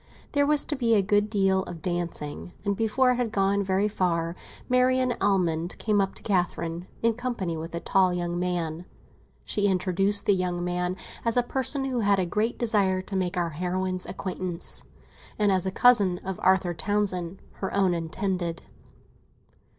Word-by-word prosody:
There 285 0 +2
was 300 -1 +3
to 295 - -2
be 235 -4 +2
a 200 - +3
good 205 +1 +2
deal 195 -3 +2
of 165 -2 -9
dancing, 175 -2 -3
and 200 0 +1
before 230 +4 +2
it 250 - 0
had 245 -3 -1
gone 200 -1 +2
very 190 +2 +1
far, 170 -4 -1 0.3
Marian 255 0 +3
Almond 175 -4 +1
came 210 -2 +1
up 195 0 -2
to - - -10
Catherine, 175 -3 -1 0.2
in 230 0 +4
company 235 -8 -3
with 165 +1 -6
a - - -2
tall 185 +1 +3
young 175 0 -2
man. 175 -2 -2 0.6
She 205 -1 +1
introduced 195 +2 +2
the 205 - +5
young 180 -2 -1
man 180 +1 -1 0.3
as 230 0 +2
a 245 - +5
person 270 +2 -1
who 255 -2 -1
had 200 -2 +3
a 185 - +1
great 210 +7 -1
desire 200 -5 +2
to 195 - -6
make 185 0 -1
our 170 -1 0
heroine's 185 +3 -2
acquaintance, 185 -2 -4 0.5
and 210 -1 +3
as 190 -1 +2
a - - -1
cousin 200 -5 +4
of 190 -1 -4
Arthur 185 -2 +3
Townsend, 185 -1 -1 0.2
her 190 - -3
own 195 -2 +2
intended. 170 +1 -2
190 Hz, 175 wpm, -26 LUFS, 175-210 Hz, 0.6 s, the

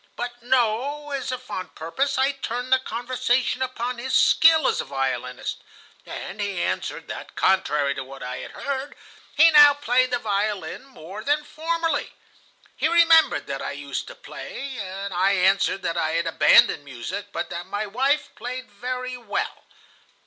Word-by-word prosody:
But 240 0 -6
no, 260 +4 0
as 270 -2 -3
if 255 - -7
on 185 - -4
purpose, 215 - -1
I 265 +1 +3
turned 255 -1 -3
the 260 - +5
conversation 250 +1 -1
upon 250 -1 -3
his 260 +2 +1
skill 320 -3 +5
as - - +1
a - - -8
violinist, 130 -2 -3 0.5
and 205 +3 -6
he 200 -3 -2
answered - - -3
that, - - -8
contrary 150 -7 +2
to 135 - -5
what 135 0 -10
I 125 0 -5
had - - -7
heard, 275 0 -4 0.4
he 325 +2 +8
now 295 -2 +8
played 255 -2 +2
the 245 - +1
violin 210 +2 -2
more 210 -5 -10
than 295 +3 +1
formerly. 325 0 -2 0.6
He - - +1
remembered 330 -1 +5
that - - -4
I - - -4
used - - -5
to - - -10
play. 270 -3 -8 0.3
I 185 +2 +2
answered 190 0 +2
that 170 - -2
I 155 0 0
had 170 +1 0
abandoned 165 -2 +5
music, 130 - -6
but - - -4
that 175 +1 -5
my 205 +2 -3
wife 265 +8 0
played 250 -2 -7
very 250 +4 -4
well. 230 -4 -4
245 Hz, 165 wpm, -24 LUFS, 190-275 Hz, 0.6 s, he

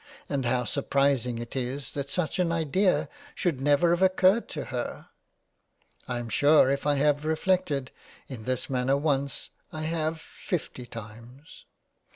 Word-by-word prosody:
And 135 -2 -1
how 125 +1 +1
surprising 135 -2 +1
it 120 +2 -7
is 130 +2 -3
that 140 -1 -4
such 180 +3 -1
an 175 -2 +2
Idea 165 +4 +2 0.3
should 160 - -1
never 145 +4 +4
have 175 +1 +1
occurred 190 +3 +4
to 150 - -4
her. 120 -1 -4 1.0
I 125 - -2
am 120 -1 -4
sure 145 +2 +5
if 140 +1 -1
I 145 - +3
have 145 +1 +2
reflected 160 -4 0 0.4
in 120 -5 -8
this 130 0 -2
manner 130 +1 +1
once, 140 -2 -1 0.2
I 155 0 -5
have 160 0 -1
fifty 150 -7 -5
times. 115 +7 -11
140 Hz, 150 wpm, -27 LUFS, 130-160 Hz, 1.0 s, sure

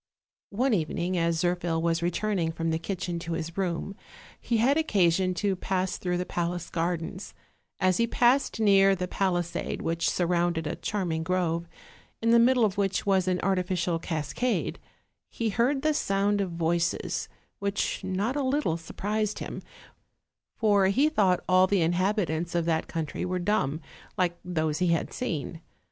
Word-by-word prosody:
One 250 +5 +1
evening, 175 0 -1
as 170 -1 +1
Zirphil 175 -2 0
was 165 0 0
returning 175 -1 0
from 165 0 -2
the 160 - 0
kitchen 175 -1 -3
to 170 0 -4
his 165 0 -4
room, 190 +1 -2 0.4
he 235 - 0
had 255 +6 +3
occasion 185 - +2
to 200 0 0
pass 185 0 -1
through 180 -1 -1
the 180 - -2
palace 175 -1 -3
gardens: 175 +3 -3 0.4
as 185 -1 +3
he 235 - +2
passed 245 +1 +2
near 195 -2 +5
the 180 0 -3
palisade 175 -2 -1
which 165 +1 0
surrounded 175 -2 0
a - - -2
charming 175 -6 -2
grove, 170 -1 -1 0.5
in 230 0 +2
the 235 - +7
middle 245 0 +5
of 200 -1 -1
which 195 -1 0
was 190 -2 +2
an 180 -1 +1
artificial 180 -2 0
cascade, 165 - -2 0.5
he 230 -1 -2
heard 255 +6 +1
the 310 0 +3
sound 200 -5 +1
of 190 - -1
voices, 170 0 -1 0.3
which 200 0 -1
not 195 +7 -1
a 290 - 0
little 265 - 0
surprised 210 +5 -2
him, - - -6 0.9
for 205 -3 +3
he 270 +10 +3
thought 190 - +2
all 185 0 +5
the 190 -3 +2
inhabitants 175 -1 0
of 170 -1 +1
that 160 -1 0
country 160 -2 -4
were 180 0 -1
dumb, 175 -6 0 0.4
like 180 -2 +1
those 160 -3 -1
he 180 - +2
had 170 -1 0
seen. 165 - -4
180 Hz, 160 wpm, -27 LUFS, 170-205 Hz, 0.9 s, the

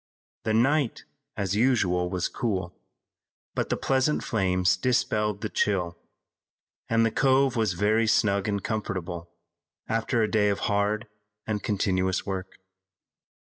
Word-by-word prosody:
The 110 - +1
night, 135 +2 +2 0.3
as 100 -1 -1
usual, 100 -7 +2
was 90 -1 -1
cool, 95 -7 -3 0.8
but - - -2
the - - 0
pleasant 135 +3 +1
flames 95 -3 +2
dispelled 105 -1 0
the 110 - -1
chill, 90 -6 0 0.9
and 115 0 +3
the 115 - +1
cove 135 +1 +3
was 110 -5 +1
very 110 +5 +2
snug 100 -2 +2
and 100 -2 -1
comfortable 90 -6 -4 0.6
after 115 +1 0
a - - +2
day 105 -2 +3
of 100 - -1
hard 105 +2 0 0.4
and 105 -2 -2
continuous 95 -3 0
work. 95 -1 -5
105 Hz, 130 wpm, -26 LUFS, 95-115 Hz, 0.9 s, and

